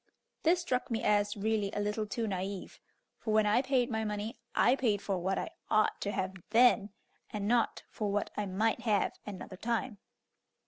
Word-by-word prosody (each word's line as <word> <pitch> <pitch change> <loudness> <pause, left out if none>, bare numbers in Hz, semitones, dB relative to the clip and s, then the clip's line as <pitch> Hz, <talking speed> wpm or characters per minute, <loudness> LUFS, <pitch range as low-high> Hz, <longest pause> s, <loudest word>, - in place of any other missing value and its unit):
This 340 +2 +4
struck 255 -7 -1
me 230 -2 -1
as 205 0 +2
really 210 -1 0
a - - -2
little 210 +1 -1
too 230 +2 -2
naive, 190 -1 -4 0.4
for 220 - -3
when 215 -1 +5
I 210 +4 +4
paid 260 -2 +1
my 220 -1 0
money 210 +1 -3 0.2
I 245 - +5
paid 225 -7 +1
for 195 -2 -2
what 190 +2 0
I - - -3 0.2
ought 215 0 +2
to 205 - -1
have 190 -1 -2
then, 230 -2 +5 0.4
and 205 -1 -3
not 235 0 +2
for 210 -2 -2
what 205 +1 -1
I 210 -1 -2
might 215 +5 +1
have 215 -4 +1
another 190 -2 -7
time. 230 0 -2
210 Hz, 185 wpm, -32 LUFS, 205-235 Hz, 0.4 s, when